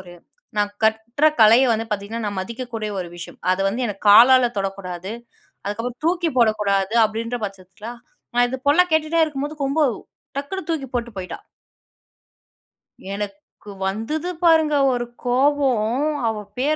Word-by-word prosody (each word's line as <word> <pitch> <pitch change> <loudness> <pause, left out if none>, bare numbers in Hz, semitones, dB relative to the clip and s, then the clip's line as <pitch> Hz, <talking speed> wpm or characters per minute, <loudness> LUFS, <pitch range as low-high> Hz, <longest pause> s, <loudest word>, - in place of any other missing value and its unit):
ஒரு 175 -1 -12 0.4
நான் 205 0 0
கற்ற 220 +6 +2
கலைய 225 +4 +7
வந்து 225 0 -2
பார்த்தீங்கன்னா, 210 +2 -4
நான் 200 -2 -3
மதிக்கக்கூடிய 225 +1 -5
ஒரு 175 - -6
விஷயம், 175 - -9
அத 185 - -2
வந்து 245 +5 -2
எனக்கு 205 -2 -7
காலால 245 +3 +7
தொடக்கூடாது, 195 -1 -4 0.5
அதுக்கப்புறம் 230 +5 -4
தூக்கி 345 -1 +1
போடக்கூடாது 210 -3 +2
அப்டின்ற 230 +3 -3
பட்சத்துல, 195 +3 -11 0.5
நான் 245 0 +5
இது 260 - -4
போல 295 +5 +5
கேட்டுட்டே 315 +1 +2
இருக்கும்போது, 295 0 -5
கொம்பு 290 +3 +2 0.5
டக்குனு 345 +7 -5
தூக்கி 310 -5 -2
போட்டு 240 -1 -2
போயிட்டா. 185 - -6 1.7
எனக்கு 200 0 -8
வந்தது 225 - -2
பாருங்க 320 -3 +4 0.2
ஒரு 240 0 -2 0.2
கோபம், 260 -1 +2 0.2
அவ 220 -1 -1 0.2
பேர 290 +5 +1
230 Hz, 135 wpm, -21 LUFS, 205-275 Hz, 1.7 s, கலைய